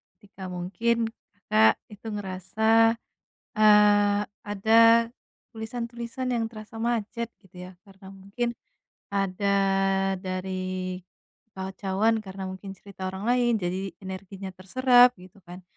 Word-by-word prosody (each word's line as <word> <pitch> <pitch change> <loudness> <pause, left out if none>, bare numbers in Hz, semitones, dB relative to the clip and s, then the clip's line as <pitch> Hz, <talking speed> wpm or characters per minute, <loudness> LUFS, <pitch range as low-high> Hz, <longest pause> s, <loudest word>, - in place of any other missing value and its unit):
ketika 195 -3 -11
mungkin, 220 +6 -1 0.3
Kakak 110 - +3 0.2
itu 210 +2 -11
ngerasa, 220 +4 +2 0.6
eee, 205 -1 +5 0.2
ada 230 +3 +5 0.5
tulisan-tulisan 235 +2 -5
yang 230 -1 0
terasa 215 0 -11
macet, 230 0 -2
gitu, 190 -2 -21
ya, - - -15
karena 195 0 -14
mungkin 200 +5 -4 0.6
ada 200 0 0 0.6
dari 185 -1 -4 0.5
kekacauan, 195 +3 -1
karena 195 -2 -8
mungkin 195 +1 -9
cerita 190 -1 -8
orang 190 +2 -6
lain, 240 -2 +3
jadi 185 -1 -3
energinya 190 0 -7
terserap, 245 +6 +4
gitu 185 +2 -16
kan. 180 +1 -10
200 Hz, 105 wpm, -26 LUFS, 190-225 Hz, 0.6 s, eee